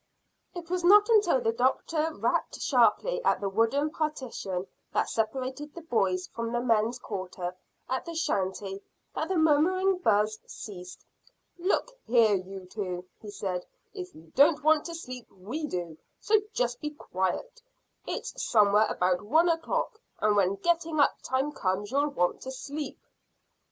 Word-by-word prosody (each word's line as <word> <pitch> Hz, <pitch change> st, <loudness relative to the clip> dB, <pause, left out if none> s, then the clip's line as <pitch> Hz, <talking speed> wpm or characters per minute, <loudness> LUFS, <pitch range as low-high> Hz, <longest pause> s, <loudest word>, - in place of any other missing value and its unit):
It 345 Hz, -1 st, -7 dB
was 365 Hz, -1 st, 0 dB
not 415 Hz, +5 st, +7 dB
until 410 Hz, -, +4 dB
the 225 Hz, -, +2 dB
doctor 305 Hz, +6 st, +1 dB
rapped -, -, -1 dB
sharply -, -, +2 dB
at -, -, +3 dB
the 200 Hz, -, -2 dB
wooden 230 Hz, +9 st, +1 dB
partition 255 Hz, -, -3 dB, 0.3 s
that -, -, +1 dB
separated 260 Hz, +6 st, -2 dB
the 340 Hz, -, -8 dB
boys' 190 Hz, -, +1 dB
from 230 Hz, 0 st, -5 dB
the 240 Hz, -, 0 dB
men's 230 Hz, 0 st, +2 dB
quarters 185 Hz, -5 st, -5 dB, 0.3 s
at 260 Hz, -, -2 dB
the 335 Hz, -1 st, -6 dB
shanty, 195 Hz, -, -1 dB, 0.3 s
that -, -, -2 dB
the 380 Hz, -, 0 dB
murmuring 360 Hz, +5 st, +3 dB
buzz 215 Hz, -, +2 dB
ceased. 180 Hz, -3 st, -9 dB, 0.5 s
"Look 385 Hz, +7 st, 0 dB, 0.2 s
here, 230 Hz, -3 st, +5 dB
you 190 Hz, 0 st, -4 dB
two," 180 Hz, -2 st, -5 dB
he 215 Hz, -, -10 dB
said; 185 Hz, -3 st, -3 dB, 0.3 s
"if 180 Hz, 0 st, -7 dB
you 160 Hz, +1 st, -16 dB
don't 290 Hz, +2 st, +5 dB
want 310 Hz, 0 st, +4 dB
to 335 Hz, -, -5 dB
sleep 255 Hz, -7 st, -8 dB
we 230 Hz, +12 st, -5 dB
do, 175 Hz, -, -5 dB, 0.2 s
so 430 Hz, 0 st, +3 dB
just 240 Hz, -, -1 dB
be 300 Hz, -, -2 dB
quiet. 295 Hz, -, -3 dB, 0.5 s
It's -, -, -4 dB
somewhere 210 Hz, -1 st, +4 dB
about 180 Hz, 0 st, +1 dB
one 315 Hz, +12 st, +3 dB
o'clock, 435 Hz, +7 st, -1 dB, 0.2 s
and 210 Hz, -1 st, +2 dB
when 195 Hz, -1 st, +3 dB
getting 330 Hz, -, 0 dB
up 285 Hz, -, +3 dB
time 265 Hz, +3 st, 0 dB
comes 200 Hz, -4 st, -2 dB
you'll 285 Hz, +2 st, +2 dB
want 180 Hz, -11 st, 0 dB
to 260 Hz, -, -6 dB
sleep." 285 Hz, +3 st, -5 dB
245 Hz, 155 wpm, -28 LUFS, 195-315 Hz, 0.5 s, not